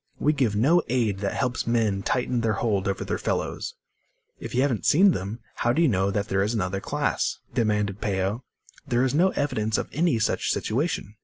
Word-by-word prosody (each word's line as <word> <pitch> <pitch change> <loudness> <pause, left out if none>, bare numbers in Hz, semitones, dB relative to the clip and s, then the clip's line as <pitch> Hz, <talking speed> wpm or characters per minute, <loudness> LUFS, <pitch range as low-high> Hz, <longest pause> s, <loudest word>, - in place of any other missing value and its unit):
We 150 - +2
give 130 -8 +1
no 150 +12 +4
aid 115 -6 0
that 100 +1 -2
helps 125 +2 -1
men 110 -4 +1
tighten 125 +3 0
their 115 -1 +1
hold 100 -2 0
over 100 - -1
their - - -2
fellows." - - -3 0.6
"If - - -6
you 130 - +3
haven't 130 -7 0
seen 190 +6 +6
them, 105 - -4 0.2
how 120 - +1
do 165 - +1
you - - +5
know 95 -5 +1
there 100 -1 0
is 105 +4 0
another 95 -1 -1
class?" - - -1 0.2
demanded 105 -4 0
Peo. 100 +4 -1 0.4
"There 120 +1 +2
is 130 - 0
no 175 +6 +4
evidence 110 - -1
of - - -3
any 160 -4 +2
such 110 - 0
situation." 115 - -2
115 Hz, 190 wpm, -25 LUFS, 100-130 Hz, 0.6 s, seen